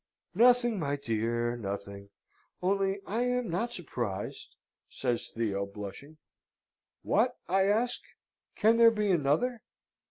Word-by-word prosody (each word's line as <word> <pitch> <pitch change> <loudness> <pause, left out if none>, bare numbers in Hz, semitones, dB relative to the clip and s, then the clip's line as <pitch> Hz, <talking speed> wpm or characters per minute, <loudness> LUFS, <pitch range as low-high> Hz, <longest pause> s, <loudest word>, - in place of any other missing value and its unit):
"Nothing, 240 -2 +4
my 145 -3 -1
dear 120 -2 -1
nothing! 100 -2 -6 0.5
only 195 +1 0
I 225 +4 -1
am 250 -1 0
not 230 +8 -1
surprised!" 120 - -5 0.3
says 120 -3 -2
Theo, 100 -4 -2
blushing. 105 +10 -9 0.9
"What," - - +2
I 190 +2 +3
ask, 230 +4 +1 0.5
"can 225 +2 +4
there 230 0 +8
be 210 -3 0
another?" 175 - +1
170 Hz, 115 wpm, -30 LUFS, -, 0.9 s, there